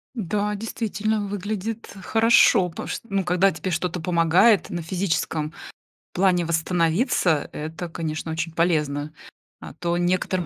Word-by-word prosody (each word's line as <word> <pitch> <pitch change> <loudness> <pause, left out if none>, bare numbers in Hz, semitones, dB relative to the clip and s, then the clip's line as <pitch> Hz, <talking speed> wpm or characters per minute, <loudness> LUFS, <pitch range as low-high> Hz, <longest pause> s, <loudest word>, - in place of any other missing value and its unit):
Да, 210 -1 -1
действительно, 215 0 -2
выглядит 205 +3 -4
хорошо, 225 -5 +4
пош 165 - -5
ну, 200 -3 -1
когда 180 +2 +3
тебе 185 - -4
что-то 180 +1 -2
помогает 175 +5 +3
на 175 -1 -4
физическом 160 -3 -2 0.6
плане 180 -2 +2
восстановиться, 170 - +1
это, 160 +3 -5
конечно, 160 -1 -4
очень 160 +1 -3
полезно, 155 -3 0 0.5
а - - -9
то 170 +3 -2
некоторым 180 0 0
180 Hz, 120 wpm, -23 LUFS, 165-200 Hz, 0.6 s, хорошо